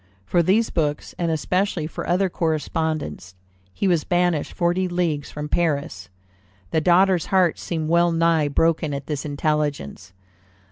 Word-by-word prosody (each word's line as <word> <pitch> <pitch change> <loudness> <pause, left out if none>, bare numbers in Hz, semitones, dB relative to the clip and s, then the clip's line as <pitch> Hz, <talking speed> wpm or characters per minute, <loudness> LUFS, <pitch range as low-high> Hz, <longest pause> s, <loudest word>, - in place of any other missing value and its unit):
For 170 - +2
these 200 +7 +2
books, 150 -3 -2
and 170 -1 0
especially 180 +1 0
for 155 - -6
other 185 +3 +2
correspondence, 155 - -2 0.4
he 195 - -1
was 170 -5 +2
banished 175 -3 0
forty 180 +1 0
leagues 170 -5 -1
from 150 0 -6
Paris. 140 - -1 0.6
The 160 - +1
daughter's 180 +1 +3
heart 185 -4 +2
seemed 160 -3 -3
well 170 +1 +3
nigh 165 -2 +2
broken 155 0 +1
at 140 0 -6
this 150 -1 -4
intelligence. 145 - -2
160 Hz, 140 wpm, -22 LUFS, 150-175 Hz, 0.6 s, daughter's